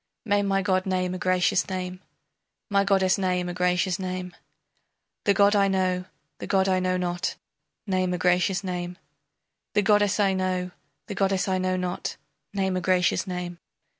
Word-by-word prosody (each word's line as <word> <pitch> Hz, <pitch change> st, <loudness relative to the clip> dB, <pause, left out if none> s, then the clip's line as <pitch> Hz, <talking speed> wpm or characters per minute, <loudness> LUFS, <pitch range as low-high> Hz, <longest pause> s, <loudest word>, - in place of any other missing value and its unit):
May 205 Hz, -2 st, +2 dB
my 195 Hz, -1 st, +1 dB
god 185 Hz, 0 st, +1 dB
name 185 Hz, -1 st, 0 dB
a 185 Hz, -, -4 dB
gracious 185 Hz, +1 st, +2 dB
name, 185 Hz, -1 st, -4 dB, 0.7 s
My 200 Hz, 0 st, +4 dB
goddess 195 Hz, -1 st, +2 dB
name 180 Hz, -1 st, 0 dB
a 175 Hz, -, -3 dB
gracious 180 Hz, +1 st, +1 dB
name, 185 Hz, -1 st, -4 dB, 0.9 s
The 200 Hz, -, +5 dB
god 200 Hz, +1 st, +5 dB
I 200 Hz, -1 st, +4 dB
know, 185 Hz, -1 st, 0 dB, 0.3 s
the -, -, -6 dB
god 190 Hz, -1 st, +2 dB
I 185 Hz, -1 st, +2 dB
know 185 Hz, 0 st, 0 dB
not 175 Hz, -1 st, -2 dB, 0.5 s
Name 185 Hz, -2 st, 0 dB
a -, -, -2 dB
gracious 180 Hz, +2 st, +2 dB
name, 180 Hz, -1 st, -4 dB, 0.8 s
The 210 Hz, -, +4 dB
goddess 205 Hz, 0 st, +3 dB
I 195 Hz, -2 st, +3 dB
know, 185 Hz, -1 st, -1 dB, 0.3 s
the 205 Hz, -, -5 dB
goddess 195 Hz, -1 st, +1 dB
I 185 Hz, -1 st, +1 dB
know 185 Hz, 0 st, 0 dB
not 180 Hz, 0 st, -3 dB, 0.3 s
Name 190 Hz, -2 st, 0 dB
a -, -, -2 dB
gracious 185 Hz, +2 st, +2 dB
name! 180 Hz, -1 st, -5 dB
185 Hz, 165 wpm, -26 LUFS, 180-195 Hz, 0.9 s, The